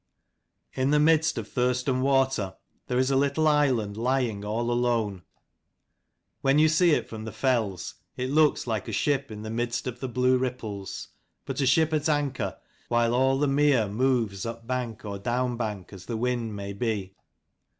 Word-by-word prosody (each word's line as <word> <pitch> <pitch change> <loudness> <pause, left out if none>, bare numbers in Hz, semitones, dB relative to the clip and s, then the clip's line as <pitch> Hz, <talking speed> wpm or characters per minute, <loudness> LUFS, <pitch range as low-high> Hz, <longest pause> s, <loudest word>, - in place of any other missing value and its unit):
In 130 +1 0
the 150 0 +4
midst 160 +1 +3
of - - -4
Thurston 125 +1 0
water 135 -7 +1 0.3
there 125 - -1
is 130 +1 +2
a - - +2
little 140 +3 +2
island, 130 -9 +2
lying 120 -3 0
all 115 +3 -1
alone. 115 -6 0 1.2
When 135 +1 +3
you 155 +1 +5
see 165 +1 +4
it - - -2
from 110 -1 -7
the 110 - -6
fells, 115 -9 -1 0.2
it 130 +1 -2
looks 155 0 +3
like 110 -4 -2
a - - -4
ship 140 -2 0
in 105 -1 -8
the 110 - -5
midst 120 +1 -2
of 125 -2 -5
the 130 - -4
blue 125 +1 +2
ripples; 110 -7 -5 0.4
but - - -3
a 135 - +2
ship 160 +4 +3
at 155 0 +1
anchor, 140 -9 -1 0.3
while 120 0 +2
all 130 +2 +3
the 145 +1 +1
mere 135 -5 +3
moves 110 -3 0
upbank 115 0 -4
or 100 -1 -5
downbank, 120 -4 -2
as 95 -2 -11
the 115 - -2
wind 120 -2 -1
may 100 0 -5
be. 100 -4 -2
125 Hz, 170 wpm, -27 LUFS, 110-135 Hz, 1.2 s, you